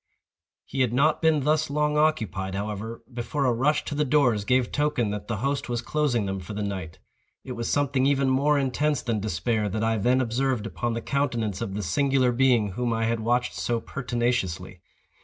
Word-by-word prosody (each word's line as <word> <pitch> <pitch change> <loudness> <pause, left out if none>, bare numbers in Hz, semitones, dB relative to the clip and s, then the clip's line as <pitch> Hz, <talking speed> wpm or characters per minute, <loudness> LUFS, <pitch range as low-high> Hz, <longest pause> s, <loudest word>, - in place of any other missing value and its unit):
He 135 - -2
had 125 -3 +1
not 150 +5 +2
been 160 -2 +3
thus 155 +1 +1
long 150 +1 +1
occupied, 110 -11 0
however, 105 +3 -5
before 135 +4 -2
a 125 - +3
rush 140 +6 +1
to - - -4
the 150 +1 +1
doors 125 -7 +2
gave 125 +1 +2
token 145 -7 0
that 105 0 -5
the 115 - -2
host 140 -2 -1
was 120 -1 -2
closing 140 -8 0
them 95 0 -3
for 95 +3 -8
the 105 - -2
night. 95 -5 -5 0.5
It 130 - -8
was 115 -1 -3
something 140 -2 +2
even 140 -1 +2
more 140 +3 +3
intense 140 +2 0
than 115 -3 -1
despair 105 +2 -1
that 110 +3 -2
I 115 0 +1
then 125 +5 +3
observed 125 -1 0
upon 120 +1 -2
the 115 - -3
countenance 120 -8 -1
of 95 - -3
the 105 - -3
singular 130 +7 +2
being 120 -4 +3
whom 120 +5 -2
I 115 0 0
had 115 0 0
watched 120 +2 0
so 120 -1 -1
pertinaciously. 120 -8 -2
120 Hz, 195 wpm, -26 LUFS, 110-140 Hz, 0.5 s, been